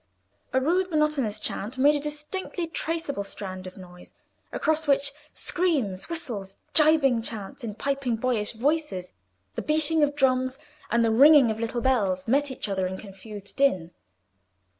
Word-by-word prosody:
A 260 - +2
rude 360 +7 +1
monotonous 300 - +1
chant 215 +3 -4
made 285 +3 +5
a 295 - 0
distinctly 300 +5 -4
traceable 325 -7 -3
strand 185 -2 -7
of 185 - -11
noise, 180 -1 -13 0.4
across 315 0 0
which 280 0 +3 0.2
screams, 270 - -1
whistles, 230 - -5 0.2
gibing 300 -6 +5
chants 220 -3 -6
in 215 -3 -5
piping 275 -1 -1
boyish 225 -2 -1
voices, 260 - -1 0.4
the - - -3
beating 310 +1 +1
of 290 -1 +2
drums, 260 -2 +2 0.3
and 235 0 +3
the 225 - +2
ringing 275 0 +7
of 220 - -5
little 235 +1 -2
bells, 200 -8 +1
met 280 +4 +2
each 260 - -5
other 190 -2 -1
in 190 +1 -5
confused 200 0 -10
din. 185 -12 +2
260 Hz, 150 wpm, -26 LUFS, 210-300 Hz, 0.4 s, ringing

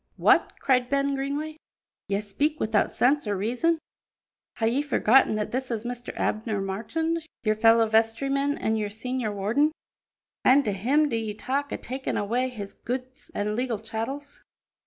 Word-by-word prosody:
"What!" - - +4
cried 250 -2 +2
Ben 280 0 +1
Greenway, 285 +3 -3 0.5
"ye 200 0 0
speak 285 +10 -1
wi'out 215 -1 +2
sense 275 0 +2
or 205 -1 0
reason. 250 - +1 0.8
Hae 225 - +1
ye 250 +5 +2
forgotten 270 -5 +4
that 210 -1 -2
this 260 +1 -2
is 230 -1 -3
Mr. 245 0 -5
Abner 215 -1 -1
Marchand, 320 +13 -2 0.2
your 215 -2 +3
fellow 225 +1 +5
vestryman 275 +6 +1
an' 220 0 0
your 210 -1 -1
senior 225 +1 -3
warden? 220 +10 +1 0.7
An' 275 +3 +6
to 210 - 0
him 265 +11 +2
do 245 - -2
ye 220 -2 -2
talk 275 +6 -2
o' - - -2
takin' 260 +2 -4
awa' 235 +5 0
his 210 -6 -7
goods 255 +1 -6
an' 210 +1 -1
legal 245 -1 -1
chattels?" 245 +7 -5
245 Hz, 160 wpm, -26 LUFS, 215-275 Hz, 0.8 s, An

